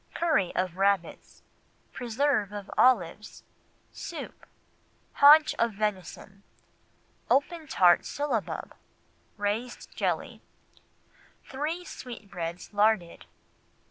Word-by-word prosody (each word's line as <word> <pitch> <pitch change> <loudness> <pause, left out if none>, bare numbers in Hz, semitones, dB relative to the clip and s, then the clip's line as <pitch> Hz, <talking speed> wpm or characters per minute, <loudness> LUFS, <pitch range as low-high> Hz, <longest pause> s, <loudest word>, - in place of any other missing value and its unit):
Curry 315 - +1
of 185 -1 -2
Rabbits. 195 -3 -1 0.5
Preserve 245 -3 0
of 205 -1 -8
Olives. 210 -5 +1 0.5
Soup. - - -8 0.7
Haunch 300 +2 +7
of 230 -1 +1
Venison. 195 -1 -4 0.9
Open 310 +3 +1
Tart 175 -8 +4
Syllabub. 280 -7 -3 0.6
Raised 215 +4 -4
Jelly. - - -2 1.0
Three 310 +6 -4
Sweetbreads 185 - -8
Larded. 205 -4 +1
215 Hz, 80 wpm, -28 LUFS, 195-275 Hz, 1.0 s, Haunch